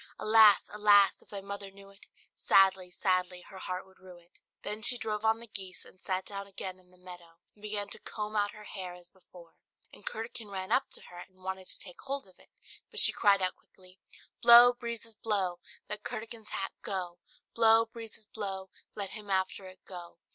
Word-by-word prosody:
Alas! 215 Hz, -1 st, +6 dB
alas! 205 Hz, -1 st, +5 dB
if -, -, -21 dB
thy 200 Hz, -1 st, -5 dB
mother 200 Hz, 0 st, -6 dB
knew 195 Hz, 0 st, -15 dB
it, 200 Hz, -, -14 dB, 0.3 s
Sadly, 190 Hz, -1 st, +4 dB
sadly 180 Hz, -1 st, -1 dB
her 190 Hz, -, -10 dB
heart 185 Hz, 0 st, -5 dB
would 190 Hz, 0 st, -23 dB
rue 185 Hz, -1 st, -13 dB
it." 175 Hz, 0 st, -20 dB, 0.2 s
Then 210 Hz, +1 st, -3 dB
she 245 Hz, +2 st, +6 dB
drove 215 Hz, -2 st, -3 dB
on 220 Hz, 0 st, +2 dB
the 235 Hz, -, -9 dB
geese 190 Hz, -4 st, -5 dB
and 185 Hz, -, -17 dB
sat 185 Hz, -1 st, -2 dB
down 200 Hz, -1 st, -6 dB
again 185 Hz, -1 st, -6 dB
in 180 Hz, -1 st, -23 dB
the 180 Hz, -, -21 dB
meadow, 175 Hz, -2 st, -12 dB, 0.2 s
and 205 Hz, -, -25 dB
began 205 Hz, -1 st, -3 dB
to -, -, -5 dB
comb 215 Hz, 0 st, -5 dB
out 205 Hz, -1 st, +2 dB
her 210 Hz, +1 st, -12 dB
hair 185 Hz, -4 st, -7 dB
as 175 Hz, 0 st, -15 dB
before, 180 Hz, -3 st, -17 dB, 0.4 s
and -, -, -14 dB
Curdken 225 Hz, 0 st, -3 dB
ran 190 Hz, 0 st, -5 dB
up 255 Hz, -, +2 dB
to -, -, -4 dB
her, 175 Hz, -, -10 dB
and 185 Hz, +1 st, -14 dB
wanted 190 Hz, 0 st, -5 dB
to -, -, -9 dB
take 180 Hz, -2 st, -10 dB
hold 275 Hz, -2 st, -4 dB
of 185 Hz, -, -19 dB
it; -, -, -21 dB, 0.4 s
but -, -, -3 dB
she -, -, +7 dB
cried 200 Hz, -2 st, +3 dB
out 185 Hz, -, 0 dB
quickly 185 Hz, 0 st, -18 dB, 0.4 s
"Blow, 240 Hz, +1 st, +10 dB
breezes, 235 Hz, -2 st, -6 dB
blow! 200 Hz, -5 st, -1 dB, 0.3 s
Let 210 Hz, 0 st, -4 dB
Curdken's 230 Hz, -2 st, -7 dB
hat 195 Hz, -, -2 dB
go, 180 Hz, -3 st, -4 dB, 0.3 s
Blow, 225 Hz, 0 st, +5 dB
breezes, 225 Hz, -1 st, -10 dB
blow! 195 Hz, -3 st, -5 dB, 0.2 s
Let 200 Hz, -2 st, -3 dB
him 210 Hz, -2 st, -8 dB
after 190 Hz, 0 st, -1 dB
it 185 Hz, 0 st, -14 dB
go! 175 Hz, -3 st, -9 dB
200 Hz, 205 wpm, -30 LUFS, 185-215 Hz, 0.4 s, Blow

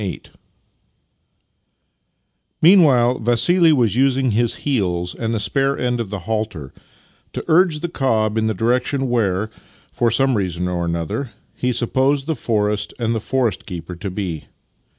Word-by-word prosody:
VIII 100 Hz, -3 st, -4 dB, 2.4 s
Meanwhile 140 Hz, -9 st, +5 dB
Vassili 125 Hz, +10 st, +4 dB
was 120 Hz, -8 st, +2 dB
using 130 Hz, -1 st, +2 dB
his 115 Hz, +2 st, +1 dB
heels 90 Hz, -10 st, -1 dB
and 115 Hz, -1 st, -3 dB
the 115 Hz, -, -1 dB
spare 135 Hz, +5 st, +1 dB
end 125 Hz, -1 st, -1 dB
of 110 Hz, -, -5 dB
the 100 Hz, -2 st, -5 dB
halter 105 Hz, -8 st, -4 dB, 0.6 s
to -, -, -5 dB
urge 160 Hz, -2 st, +3 dB
the 175 Hz, -, -2 dB
cob 110 Hz, -9 st, 0 dB
in 110 Hz, 0 st, +1 dB
the 110 Hz, -, -1 dB
direction 125 Hz, +5 st, 0 dB
where, 105 Hz, -3 st, 0 dB, 0.4 s
for 120 Hz, -, +1 dB
some 135 Hz, +3 st, +2 dB
reason 90 Hz, -3 st, -2 dB
or 90 Hz, -1 st, -2 dB
another, 85 Hz, -, -3 dB, 0.2 s
he 125 Hz, -, -1 dB
supposed 130 Hz, +4 st, 0 dB
the 160 Hz, -, -1 dB
forest 105 Hz, -4 st, -1 dB
and 115 Hz, -2 st, -1 dB
the 115 Hz, -, -1 dB
forest 125 Hz, 0 st, -1 dB
keeper 90 Hz, -2 st, -7 dB
to 100 Hz, +3 st, -5 dB
be. 90 Hz, -5 st, -5 dB
115 Hz, 150 wpm, -20 LUFS, 100-135 Hz, 2.4 s, Meanwhile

